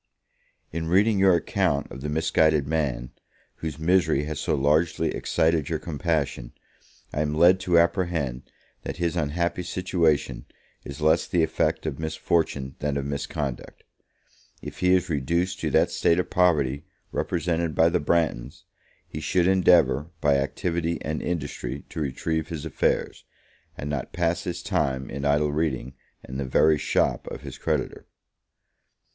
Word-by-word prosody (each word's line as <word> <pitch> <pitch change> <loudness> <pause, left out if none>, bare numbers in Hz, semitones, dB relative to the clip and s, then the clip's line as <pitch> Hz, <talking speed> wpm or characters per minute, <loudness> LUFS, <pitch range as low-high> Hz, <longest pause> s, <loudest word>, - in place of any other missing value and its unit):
In 80 0 -3
reading 100 +4 +3
your 95 -2 +5
account 70 -3 0
of 65 - -8
the 75 - -3
misguided 80 -1 +2
man, 70 -6 -1 0.5
whose 80 -3 -5
misery 80 -3 +2
has 75 -1 -4
so - - 0
largely 75 +4 +1
excited 80 -3 +1
your 80 - 0
compassion, 75 -6 -2 0.6
I 75 - 0
am 75 0 -1
led 90 +4 +6
to 90 -2 +2
apprehend 85 -7 0 0.3
that - - -6
his 85 -1 -1
unhappy 85 +3 -1
situation 85 -9 0 0.4
is 70 +1 -8
less 80 +1 +3
the 85 -2 +2
effect 80 0 0
of 65 - -3
misfortune 80 -4 -1
than 75 -1 -1
of 70 - -3
misconduct. 70 -1 -4 0.8
If - - -9
he 90 0 +4
is 95 0 0
reduced 85 +4 -1
to - - -1
that - - +3
state 85 - +2
of 90 - -2
poverty 75 -7 +2 0.3
represented 85 -2 -1
by 80 +1 +5
the 85 +1 0
Branghtons, 75 -6 -1 0.4
he 75 - -6
should 85 +3 +1
endeavour, 90 -5 +4
by 70 -2 +3
activity 85 +4 -1
and 75 0 -3
industry, 70 -6 -4
to 80 - -6
retrieve 80 +3 -2
his 80 -3 -6
affairs, 80 - -1 0.5
and 70 - -5
not 75 -3 -4
pass 85 0 0
his 90 -2 -4
time 65 0 -1
in 70 +2 -4
idle 75 +1 +2
reading 70 -4 -2 0.3
in 65 - -6
the 70 - -2
very 75 +4 +3
shop - - 0
of - - -7
his - - -9
creditor. - - -2
80 Hz, 150 wpm, -25 LUFS, 70-85 Hz, 0.8 s, led